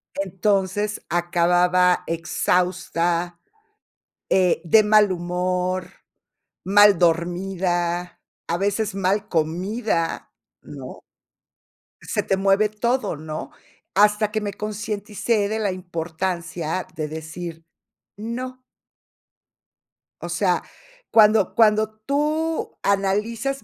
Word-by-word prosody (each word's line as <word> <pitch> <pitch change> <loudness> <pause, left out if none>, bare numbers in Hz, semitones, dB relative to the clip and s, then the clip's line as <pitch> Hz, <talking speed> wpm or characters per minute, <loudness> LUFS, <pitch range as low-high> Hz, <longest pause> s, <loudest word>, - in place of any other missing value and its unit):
Entonces, 195 +2 -1
acababa 175 +1 +3
exhausta, 175 0 0 0.9
eh, 180 -3 +3
de 215 +6 +6
mal 210 -1 +5
humor, 180 +1 -2 0.8
mal 205 -1 +6
dormida, 175 0 0 0.3
a 170 - 0
veces 205 +2 -1
mal 195 +2 0
comida, 175 +3 -1 0.3
¿no? - - -10 1.0
Se 210 - -2
te 195 - 0
mueve 195 +2 +3
todo, 230 -2 -1
¿no? 155 0 -6 0.4
Hasta 210 +1 +3
que 215 - 0
me 205 -2 -3
concienticé 210 0 -2
de 220 0 -2
la 205 -3 0
importancia 175 0 -4
de 155 -1 -3
decir, 160 +1 -7 0.5
no. 255 +4 -6 1.6
O - - -5
sea, - - +1 0.5
cuando 215 -2 +5
cuando 215 -1 +4 0.2
tú 305 +3 -1
analizas 215 +7 0
190 Hz, 90 wpm, -23 LUFS, 175-210 Hz, 1.6 s, de